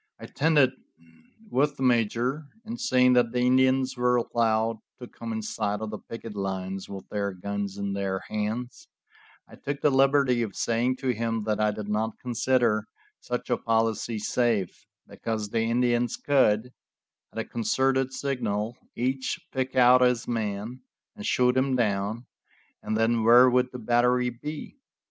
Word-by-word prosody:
I -, -, -8 dB
tented 145 Hz, -3 st, +3 dB, 0.8 s
with 145 Hz, +2 st, +1 dB
the 135 Hz, -, -3 dB
major, 125 Hz, +4 st, +1 dB, 0.2 s
and 235 Hz, +2 st, -6 dB
seeing 125 Hz, -, +4 dB
that 120 Hz, -2 st, +3 dB
the 125 Hz, 0 st, 0 dB
Indians 130 Hz, +1 st, +3 dB
were 125 Hz, 0 st, +2 dB
allowed 115 Hz, -2 st, +1 dB, 0.2 s
to 125 Hz, -, -8 dB
come 115 Hz, -1 st, -8 dB
inside 105 Hz, -1 st, -2 dB
of 110 Hz, -1 st, -5 dB
the 110 Hz, -, -6 dB
picket 115 Hz, -1 st, -9 dB
lines 95 Hz, -1 st, -4 dB
with 95 Hz, -1 st, -8 dB
their 100 Hz, -1 st, -2 dB
guns 100 Hz, +1 st, -4 dB
in 100 Hz, 0 st, -3 dB
their 95 Hz, -1 st, -2 dB
hands, 110 Hz, +4 st, -4 dB, 0.6 s
I -, -, -15 dB
took 140 Hz, 0 st, -4 dB
the 150 Hz, -, +3 dB
liberty 135 Hz, -2 st, +3 dB
of 110 Hz, -4 st, -3 dB
saying 120 Hz, +3 st, 0 dB
to 135 Hz, -, -1 dB
him 115 Hz, -2 st, -1 dB
that 105 Hz, 0 st, -1 dB
I 105 Hz, 0 st, +3 dB
did 105 Hz, 0 st, -5 dB
not 110 Hz, +1 st, -1 dB
consider 120 Hz, -2 st, +1 dB, 0.3 s
such -, -, -4 dB
a -, -, +3 dB
policy 115 Hz, 0 st, 0 dB
safe, 110 Hz, -3 st, -1 dB, 0.2 s
because 110 Hz, -2 st, -4 dB
the 115 Hz, +1 st, 0 dB
Indians 120 Hz, +1 st, +1 dB
could, 125 Hz, -4 st, +2 dB, 0.6 s
at -, -, -13 dB
a -, -, -2 dB
concerted 130 Hz, +3 st, 0 dB
signal, 120 Hz, -5 st, -2 dB, 0.2 s
each 130 Hz, +2 st, -2 dB
pick 130 Hz, 0 st, -2 dB
out 125 Hz, 0 st, +6 dB
his 125 Hz, -2 st, +2 dB
man 110 Hz, +1 st, -3 dB, 0.3 s
and 210 Hz, 0 st, -6 dB
shoot 125 Hz, 0 st, +3 dB
him 130 Hz, 0 st, +2 dB
down, 105 Hz, 0 st, -1 dB, 0.6 s
and 110 Hz, -, -2 dB
then 115 Hz, 0 st, +2 dB
where 120 Hz, +3 st, +7 dB
would 125 Hz, 0 st, +2 dB
the 125 Hz, -, -7 dB
battery 125 Hz, +1 st, +2 dB
be? 150 Hz, -, -8 dB
120 Hz, 160 wpm, -26 LUFS, 110-130 Hz, 0.8 s, where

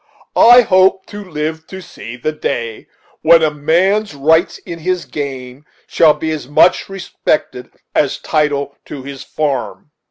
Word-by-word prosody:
I 245 Hz, +2 st, +8 dB
hope 190 Hz, -2 st, +3 dB
to 205 Hz, 0 st, -7 dB
live 160 Hz, -2 st, -5 dB
to 190 Hz, -, -9 dB
see 115 Hz, -, -10 dB
the 125 Hz, +5 st, -3 dB
day 115 Hz, -7 st, -4 dB, 0.3 s
when 165 Hz, +1 st, +5 dB
a 155 Hz, -, +2 dB
man's 175 Hz, +6 st, +1 dB
rights 160 Hz, +5 st, +2 dB
in 170 Hz, -2 st, -9 dB
his 180 Hz, +2 st, -2 dB
game 135 Hz, -2 st, -6 dB, 0.2 s
shall 155 Hz, -2 st, +3 dB
be 160 Hz, -, -3 dB
as 155 Hz, -5 st, -5 dB
much 145 Hz, +7 st, +3 dB
respected 155 Hz, -8 st, -3 dB, 0.2 s
as 140 Hz, -3 st, +1 dB
his -, -, -13 dB
title 145 Hz, -3 st, -1 dB
to 140 Hz, -3 st, -8 dB
his 140 Hz, 0 st, -8 dB
farm." 145 Hz, -1 st, -4 dB
155 Hz, 155 wpm, -16 LUFS, 140-180 Hz, 0.3 s, I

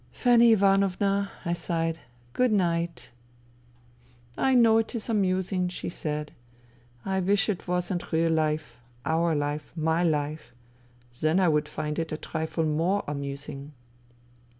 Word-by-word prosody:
" -, -, -31 dB
Fanny 235 Hz, -2 st, +5 dB
Ivanovna," 195 Hz, 0 st, +2 dB
I 170 Hz, -, 0 dB
sighed, 165 Hz, -1 st, -2 dB, 0.2 s
" 120 Hz, 0 st, -30 dB
good 250 Hz, -2 st, +2 dB
night." 170 Hz, -4 st, -1 dB, 0.6 s
" 120 Hz, 0 st, -30 dB, 0.2 s
I -, -, +4 dB
know 225 Hz, -2 st, +6 dB
it 225 Hz, +2 st, -3 dB
is 230 Hz, 0 st, -5 dB
amusing," 185 Hz, -3 st, +1 dB
she 180 Hz, -, -5 dB
said. 150 Hz, -2 st, -4 dB, 0.4 s
" 120 Hz, -, -30 dB, 0.3 s
I 190 Hz, 0 st, 0 dB
wish 195 Hz, +2 st, +2 dB
it 200 Hz, -4 st, -3 dB
wasn't 180 Hz, 0 st, -2 dB
real 165 Hz, 0 st, +2 dB
life, 155 Hz, -1 st, -1 dB, 0.3 s
our 160 Hz, +2 st, +1 dB
life, 145 Hz, +1 st, -3 dB
my 160 Hz, +1 st, +1 dB
life. 150 Hz, -3 st, -1 dB, 0.7 s
Then 155 Hz, +4 st, +2 dB
I 185 Hz, -3 st, +4 dB
would 150 Hz, -1 st, +1 dB
find 150 Hz, +1 st, -3 dB
it 165 Hz, -1 st, -3 dB
a 155 Hz, -, -2 dB
trifle 160 Hz, +1 st, -3 dB
more 165 Hz, +6 st, +1 dB
amusing." 140 Hz, 0 st, -6 dB
165 Hz, 150 wpm, -27 LUFS, 150-190 Hz, 0.7 s, know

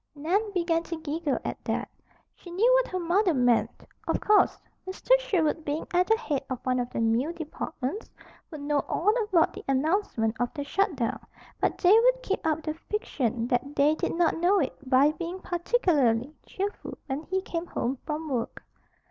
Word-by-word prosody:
Nan 380 Hz, +9 st, 0 dB
began 340 Hz, -3 st, +1 dB
to 335 Hz, -1 st, -6 dB
giggle 315 Hz, -2 st, -2 dB
at -, -, -5 dB
that. -, -, -1 dB, 0.5 s
She 355 Hz, -, -14 dB
knew 435 Hz, +8 st, +3 dB
what -, -, +3 dB
her 370 Hz, -, -1 dB
mother 355 Hz, +1 st, +2 dB
meant. 245 Hz, -2 st, +1 dB, 0.2 s
Of -, -, +1 dB
course, 420 Hz, 0 st, +4 dB, 0.3 s
Mr. 375 Hz, +6 st, -6 dB
Sherwood, 330 Hz, -9 st, 0 dB
being 295 Hz, +2 st, -3 dB
at 360 Hz, +1 st, +3 dB
the 445 Hz, -, +4 dB
head 295 Hz, -, -2 dB
of 260 Hz, -, -2 dB
one 255 Hz, -1 st, +1 dB
of 245 Hz, 0 st, -2 dB
the -, -, -4 dB
mill 230 Hz, +8 st, +1 dB
departments, 320 Hz, -, -5 dB, 0.4 s
would 310 Hz, -4 st, -8 dB
know 290 Hz, 0 st, +1 dB
all 415 Hz, +5 st, +2 dB
about 355 Hz, -6 st, +3 dB
the -, -, -9 dB
announcement 270 Hz, -, 0 dB
of 245 Hz, 0 st, 0 dB
the 285 Hz, -, -3 dB
shut 390 Hz, +4 st, 0 dB
down; 235 Hz, -4 st, -2 dB, 0.4 s
but -, -, 0 dB
they 360 Hz, -, +4 dB
would -, -, +4 dB
keep 395 Hz, -, -2 dB
up 315 Hz, 0 st, 0 dB
the 310 Hz, -, -2 dB
fiction 275 Hz, -, -2 dB
that 275 Hz, +3 st, -1 dB
they 290 Hz, +2 st, +4 dB
did 315 Hz, -, -2 dB
not 340 Hz, -1 st, +2 dB
know 365 Hz, +4 st, +3 dB
it 280 Hz, -, -1 dB
by 275 Hz, +3 st, +5 dB
being 345 Hz, +3 st, -6 dB
particularly 305 Hz, -, +1 dB
cheerful 400 Hz, +2 st, -5 dB
when 270 Hz, +1 st, -3 dB
he 380 Hz, 0 st, +1 dB
came 340 Hz, -1 st, -4 dB
home 255 Hz, -3 st, -2 dB
from 310 Hz, +1 st, -4 dB
work. 245 Hz, -5 st, -3 dB
320 Hz, 185 wpm, -27 LUFS, 275-375 Hz, 0.5 s, by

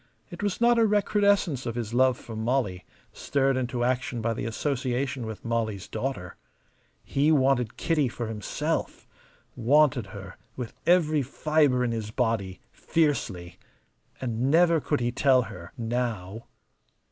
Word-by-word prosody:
It -, -, -8 dB
was 205 Hz, -2 st, -1 dB
not 235 Hz, 0 st, +4 dB
a 225 Hz, -, +5 dB
recrudescence 200 Hz, -, +2 dB
of 115 Hz, -, -3 dB
his 115 Hz, -2 st, -4 dB
love 130 Hz, 0 st, +3 dB
for 115 Hz, -, -9 dB
Molly, 110 Hz, -5 st, -1 dB, 0.3 s
stirred 135 Hz, -1 st, 0 dB
into 125 Hz, -1 st, -1 dB
action 125 Hz, -1 st, -1 dB
by 115 Hz, +1 st, 0 dB
the -, -, -4 dB
association 130 Hz, 0 st, -2 dB
with 110 Hz, 0 st, -8 dB
Molly's 110 Hz, -4 st, -2 dB
daughter. 110 Hz, -7 st, -4 dB, 0.7 s
He 145 Hz, +3 st, +1 dB
wanted 130 Hz, -5 st, +2 dB
Kitty 155 Hz, -5 st, +1 dB
for 120 Hz, 0 st, -5 dB
himself, 110 Hz, -3 st, -3 dB, 0.5 s
wanted 135 Hz, -2 st, +3 dB
her 100 Hz, -1 st, -10 dB, 0.2 s
with 125 Hz, -3 st, -6 dB
every 160 Hz, -4 st, +4 dB
fibre 140 Hz, -1 st, +1 dB
in 120 Hz, -, 0 dB
his 110 Hz, -2 st, -3 dB
body, 110 Hz, -5 st, -1 dB
fiercely. 95 Hz, -, -1 dB, 0.6 s
And 125 Hz, +1 st, -1 dB
never 165 Hz, +1 st, +4 dB
could 145 Hz, -2 st, -1 dB
he 120 Hz, 0 st, 0 dB
tell 130 Hz, 0 st, +3 dB
her 90 Hz, -5 st, -10 dB
now. 115 Hz, -3 st, -3 dB
125 Hz, 140 wpm, -27 LUFS, 110-145 Hz, 0.7 s, a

